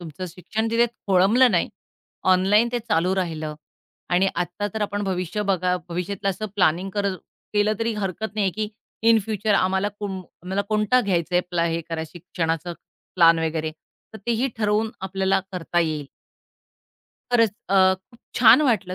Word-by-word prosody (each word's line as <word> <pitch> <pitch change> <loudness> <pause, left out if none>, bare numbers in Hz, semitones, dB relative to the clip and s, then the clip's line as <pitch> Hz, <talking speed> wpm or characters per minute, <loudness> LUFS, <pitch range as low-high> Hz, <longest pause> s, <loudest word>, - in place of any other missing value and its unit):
तुमचं 175 +2 -7
शिक्षण 195 +6 -3
तिथे 235 +1 +3 0.2
खोळंबल 195 +6 +4
नाही, 175 -5 +1 0.6
ऑनलाईन 205 +5 +4
ते 245 - +1
चालू 185 -5 0
राहिलं 160 -5 -3 0.6
आणि 190 +2 +4
आत्ता 175 +4 -2
तर 215 - -1
आपण 205 0 -2
भविष्य 190 +2 -2
बघा 180 -1 +1
भविष्यातलं 180 +3 -3
असं 215 +3 -4
प्लॅनिंग 185 +1 +2
कर 200 +1 -1 0.5
केलं, 210 +1 +2
तरी 230 0 0
हरकत 210 +1 -4
नाहीये 200 -3 +1
की 215 -1 -1 0.4
इन 225 -1 +7
फ्युचर 215 -1 0
आम्हाला 190 +2 +2
कुंब 195 -3 -4 0.2
आम्हाला 190 +2 -1
कोणता 215 +4 +3
घ्यायचाय 180 -4 +1
प्ला 170 -1 +1
हे 165 0 -1 0.3
शिक्षणाचा 170 0 -3 0.4
प्लॅन 165 -2 +6
वगैरे, 160 -1 -1 0.4
तर 220 - -9
तेही 235 +3 +1
ठरवून 215 0 +1
आपल्याला 190 0 0
करता 175 -1 -1
येईल. 155 -3 -2 1.3
खरंच, 230 -3 +4 0.2
अ, 190 -1 +5
खूप 230 +6 -20 0.2
छान 245 +4 +7
वाटलं 190 -5 0
190 Hz, 150 wpm, -23 LUFS, 175-215 Hz, 1.3 s, इन